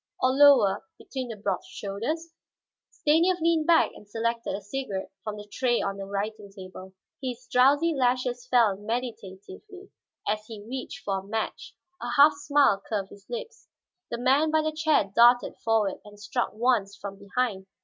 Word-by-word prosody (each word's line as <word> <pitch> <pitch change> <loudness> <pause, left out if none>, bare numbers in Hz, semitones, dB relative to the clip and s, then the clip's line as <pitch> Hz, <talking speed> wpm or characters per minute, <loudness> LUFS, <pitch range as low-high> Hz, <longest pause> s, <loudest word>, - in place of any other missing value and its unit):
Or 255 - +3
lower, 275 -7 +5
between 260 -2 -6
the 230 - -6
broad 200 -2 -2
shoulders 295 +12 -5 0.6
Stanief 335 +4 +2
leaned 330 -1 +2
back 335 -1 +5
and 205 - -15
selected 230 -1 -2
a - - -4
cigarette 205 -2 -5
from 215 -1 -5
the 210 - -9
tray 240 +2 0
on 195 0 -2
the 195 - -6
writing 200 +1 -4
table. 190 -1 -11 0.3
His 250 -2 -5
drowsy 285 +6 +4
lashes 250 -2 0
fell 230 -6 +3
meditatively 230 - -7 0.4
as 215 +1 0
he 215 -3 -9
reached 265 +2 -6
for 195 -1 0
a - - -11
match, 220 +3 -4 0.3
a - - -4
half 295 +2 +8
smile 285 -7 +2
curved 200 -3 -2
his 200 - -15
lips. 475 -1 -7 0.4
The - - -3
man 270 +6 +3
by 310 0 +2
the 310 - 0
chair 310 -3 +2
darted 240 +1 +5
forward 220 -4 +1
and 205 0 -14
struck 235 +3 -2
once, 215 -3 +1
from 200 -1 -8
behind. 200 -2 -2
235 Hz, 165 wpm, -27 LUFS, 205-280 Hz, 0.6 s, half